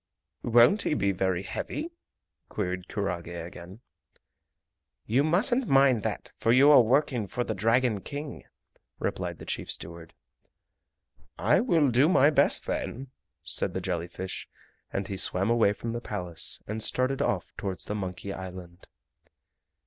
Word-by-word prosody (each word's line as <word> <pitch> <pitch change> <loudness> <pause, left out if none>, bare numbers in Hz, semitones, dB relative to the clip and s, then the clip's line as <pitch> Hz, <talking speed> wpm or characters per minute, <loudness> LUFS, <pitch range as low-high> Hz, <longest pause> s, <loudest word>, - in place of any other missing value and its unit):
"Won't 120 - +5
he - - 0
be 100 -7 +1
very 95 -1 -1
heavy?" 315 - -5 0.6
queried 90 0 -3
kurage 90 -5 -3
again. 85 +4 -9 1.2
"You 130 +6 +2
mustn't 225 - +2
mind 135 -4 +4
that, - - -4
for 115 - +2
you 135 +4 +6
are 140 - +8
working 125 -2 +1
for 120 +6 -2
the 110 - -3
Dragon 115 +2 +1
King," 145 +3 -7 0.5
replied - - -3
the - - -11
chief - - -4
steward. 85 -1 -3 1.2
"I - - +3
will 165 - +2
do 130 +7 +4
my 145 -4 +5
best - - +3
then," 130 +2 -4 0.3
said - - -2
the - - 0
jelly 90 -2 -3
fish, 95 +2 -7 0.4
and 100 0 -3
he 100 - -5
swam 95 +4 +2
away 115 -4 +4
from 115 +2 -5
the 120 - -4
Palace 90 -7 -2
and 110 +1 -4
started 130 +4 +1
off - - -1
towards 95 -2 -5
the - - -4
Monkey 100 -1 -5
Island. 90 -1 -9
110 Hz, 145 wpm, -27 LUFS, 95-135 Hz, 1.2 s, are